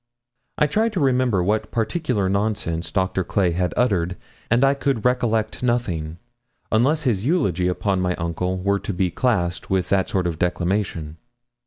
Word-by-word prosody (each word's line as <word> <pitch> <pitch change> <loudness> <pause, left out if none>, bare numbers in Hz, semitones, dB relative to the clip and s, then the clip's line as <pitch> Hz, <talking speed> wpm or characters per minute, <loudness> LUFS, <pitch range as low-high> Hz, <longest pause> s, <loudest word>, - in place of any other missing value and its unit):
I 150 - +4
tried 215 +9 +1
to 190 - -1
remember 125 - +2
what 105 +4 0
particular 115 - -1
nonsense 100 -4 -1
Doctor 95 -1 0
Clay 90 -1 +1
had 90 +1 0
uttered, 90 -8 +1 0.3
and 120 +3 +3
I 135 0 +5
could 140 -5 -1
recollect 115 -3 +1
nothing, 90 -11 -1 0.5
unless 140 +8 +2
his 110 -8 0
eulogy 105 - +1
upon 95 +1 0
my 90 -1 0
uncle 90 +2 -2
were 100 +2 0
to 100 - -4
be 90 0 0
classed 90 -6 0
with 95 -1 0
that 95 -1 +2
sort 95 -2 0
of 85 -2 -2
declamation. 90 -3 -1
100 Hz, 160 wpm, -22 LUFS, 90-125 Hz, 0.5 s, I